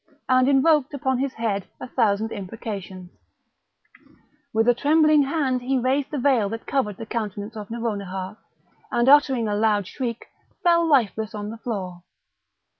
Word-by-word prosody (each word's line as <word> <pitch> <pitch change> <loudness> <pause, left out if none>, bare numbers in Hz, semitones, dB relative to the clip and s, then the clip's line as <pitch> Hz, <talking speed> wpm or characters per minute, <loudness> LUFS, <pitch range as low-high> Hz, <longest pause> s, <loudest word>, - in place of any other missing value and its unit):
and 255 +1 +4
invoked 285 +1 +3
upon 260 -2 -1
his 270 0 -1
head 210 -4 -2
a - - -7
thousand 220 -3 0
imprecations; 195 -3 -7 1.4
with 225 +1 +1
a 245 - +6
trembling 305 +3 +4
hand 275 -3 0
he 265 +2 0
raised 260 +3 0
the 295 - -4
veil 245 -6 +2
that 225 +1 -6
covered 210 -8 -1
the 225 - -7
countenance 210 -1 -5
of 210 -2 -7
Nouronihar, 200 -4 -4 0.6
and, 240 +1 +1
uttering 270 -5 +5
a 210 - -1
loud 210 -2 +2
shriek, 235 +2 -5 0.4
fell 340 -2 +4
lifeless 220 - +1
on 210 0 -5
the 225 - -8
floor. 190 -8 -5
230 Hz, 150 wpm, -23 LUFS, 210-270 Hz, 1.4 s, a